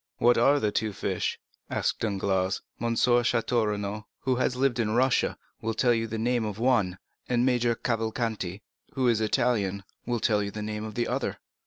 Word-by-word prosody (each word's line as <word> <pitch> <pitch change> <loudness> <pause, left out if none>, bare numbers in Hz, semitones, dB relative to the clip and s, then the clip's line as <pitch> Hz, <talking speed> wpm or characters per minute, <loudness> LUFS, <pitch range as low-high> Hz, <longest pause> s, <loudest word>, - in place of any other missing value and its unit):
"What 120 +1 +5
are 140 +5 +4
the 105 -4 0
two 105 0 -1
fish?" - - -2 0.3
asked - - -1
Danglars. 95 -3 0 0.2
"M. 115 0 0
Château 120 -1 +2
Renaud, 105 0 -3
who 130 -2 +1
has 125 0 +1
lived 130 -2 +1
in 110 -1 +1
Russia, 130 0 +2 0.2
will 110 0 -2
tell 125 -2 +3
you 115 0 0
the 110 0 -4
name 120 +1 +1
of 105 -2 -4
one, 110 -7 +2 0.3
and 125 0 +2
Major 120 -2 +2
Cavalcanti, 110 -4 -2 0.3
who 130 -2 +1
is 115 -3 +3
an 110 - +1
Italian, 105 -6 +1 0.2
will 120 -1 0
tell 105 -1 +2
you 100 - -2
the 105 +1 -6
name 105 0 -4
of 110 -1 -7
the 120 -1 0
other." - - -2
115 Hz, 190 wpm, -27 LUFS, 105-120 Hz, 0.3 s, What